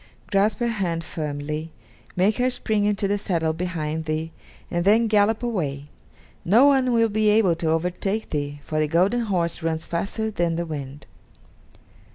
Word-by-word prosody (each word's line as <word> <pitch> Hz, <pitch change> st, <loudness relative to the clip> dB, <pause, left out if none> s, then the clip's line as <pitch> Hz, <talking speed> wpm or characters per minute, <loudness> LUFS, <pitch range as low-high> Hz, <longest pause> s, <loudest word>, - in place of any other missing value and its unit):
Grasp 205 Hz, +1 st, +2 dB
her 240 Hz, -, 0 dB
hand 180 Hz, -7 st, -1 dB
firmly; 150 Hz, 0 st, -4 dB, 0.4 s
make 195 Hz, +4 st, +2 dB
her 250 Hz, +1 st, +2 dB
spring 220 Hz, -4 st, 0 dB
into 205 Hz, -1 st, +1 dB
the 205 Hz, +1 st, 0 dB
saddle 165 Hz, -5 st, 0 dB
behind 160 Hz, -2 st, -3 dB
thee, 155 Hz, +1 st, -2 dB, 0.4 s
and 175 Hz, 0 st, 0 dB
then 215 Hz, +5 st, +4 dB
gallop 215 Hz, +1 st, +2 dB
away; 150 Hz, -, -2 dB, 0.6 s
no 225 Hz, +10 st, +5 dB
one 265 Hz, -3 st, +4 dB
will 230 Hz, -1 st, +3 dB
be 215 Hz, 0 st, +2 dB
able 210 Hz, -5 st, +4 dB
to 165 Hz, -1 st, -1 dB
overtake 180 Hz, +6 st, -1 dB
thee, 145 Hz, -1 st, -3 dB
for 155 Hz, -, -2 dB
the 155 Hz, -, +2 dB
golden 185 Hz, +10 st, +2 dB
horse 180 Hz, -7 st, -1 dB
runs 160 Hz, -1 st, -2 dB
faster 200 Hz, +6 st, -2 dB
than 175 Hz, -4 st, 0 dB
the 170 Hz, +1 st, -2 dB
wind." 145 Hz, -3 st, -7 dB
180 Hz, 165 wpm, -24 LUFS, 160-215 Hz, 0.6 s, no